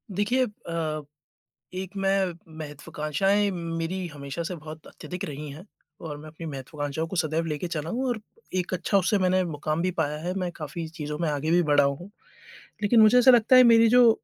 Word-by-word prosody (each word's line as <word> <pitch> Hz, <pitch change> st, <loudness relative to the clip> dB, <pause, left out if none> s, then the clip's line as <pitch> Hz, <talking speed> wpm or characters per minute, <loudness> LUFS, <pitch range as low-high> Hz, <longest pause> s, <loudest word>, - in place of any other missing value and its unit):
देखिए 240 Hz, +6 st, +2 dB
अ, 165 Hz, -7 st, -4 dB, 0.7 s
एक 185 Hz, 0 st, -4 dB
मैं 195 Hz, -2 st, +1 dB, 0.3 s
महत्वाकांक्षाएँ 155 Hz, +7 st, -1 dB
मेरी 170 Hz, +1 st, -3 dB
हमेशा 145 Hz, +1 st, -6 dB
से 175 Hz, +2 st, -4 dB
बहुत 155 Hz, 0 st, -10 dB
अत्यधिक 180 Hz, 0 st, -7 dB
रही 150 Hz, 0 st, -6 dB
हैं 155 Hz, +7 st, -10 dB, 0.4 s
और 150 Hz, -2 st, -5 dB
मैं 155 Hz, +1 st, -10 dB
अपनी 160 Hz, +2 st, -9 dB
महत्वाकांक्षाओं 145 Hz, +2 st, -4 dB
को 190 Hz, -, -6 dB
सदैव 160 Hz, 0 st, 0 dB
ले 150 Hz, -2 st, -2 dB
चला 160 Hz, -2 st, -4 dB
हूँ 255 Hz, +5 st, -1 dB
और 240 Hz, -3 st, -1 dB, 0.4 s
एक 185 Hz, 0 st, -1 dB
अच्छा 190 Hz, +3 st, +1 dB
उससे 195 Hz, +2 st, +2 dB
मैंने 185 Hz, 0 st, +2 dB
मुकाम 155 Hz, 0 st, -2 dB
भी 185 Hz, -, +1 dB
पाया 160 Hz, -4 st, -1 dB
है, 175 Hz, +4 st, -3 dB
मैं 185 Hz, -2 st, -2 dB
काफ़ी 160 Hz, +1 st, -6 dB
चीज़ों 150 Hz, -2 st, -6 dB
में 170 Hz, -1 st, 0 dB
आगे 150 Hz, +1 st, -1 dB
भी 175 Hz, +1 st, +4 dB
बढ़ा 145 Hz, -3 st, +4 dB
हूँ। 140 Hz, +8 st, -3 dB, 0.7 s
लेकिन 220 Hz, +3 st, +5 dB
मुझे 215 Hz, +3 st, +7 dB
ऐसा 250 Hz, +1 st, +7 dB
लगता 240 Hz, +1 st, +6 dB
है 255 Hz, -, +9 dB
मेरी 230 Hz, -1 st, +6 dB
जो 245 Hz, 0 st, +7 dB
170 Hz, 190 wpm, -26 LUFS, 155-195 Hz, 0.7 s, है